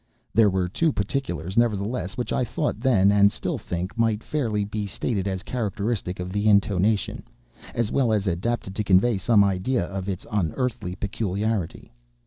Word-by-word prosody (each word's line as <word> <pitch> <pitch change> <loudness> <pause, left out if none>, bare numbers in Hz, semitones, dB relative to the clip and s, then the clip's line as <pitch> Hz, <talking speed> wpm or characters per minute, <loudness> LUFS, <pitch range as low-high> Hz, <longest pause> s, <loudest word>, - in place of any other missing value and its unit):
There 110 0 +5
were 95 -2 0
two 160 - +1
particulars, 100 - -3
nevertheless, 105 -4 0
which 125 - -2
I - - +1
thought 120 0 -2
then, 110 -6 +4
and 100 0 +5
still - - -3
think, 90 +3 -4
might 115 -2 +1
fairly 115 -9 -1
be 105 0 -3
stated 100 -1 -2
as 95 -1 -3
characteristic 105 -5 -2
of 90 +1 -4
the 105 +1 +2
intonation—as 100 - 0
well 130 -5 +2
adapted 105 +1 -1
to 105 - -1
convey 100 +3 +3
some 105 -1 +4
idea 100 +3 0
of 95 +1 -5
its 95 -1 -4
unearthly 105 - -1
peculiarity. 105 - -2
100 Hz, 150 wpm, -25 LUFS, 95-115 Hz, -, There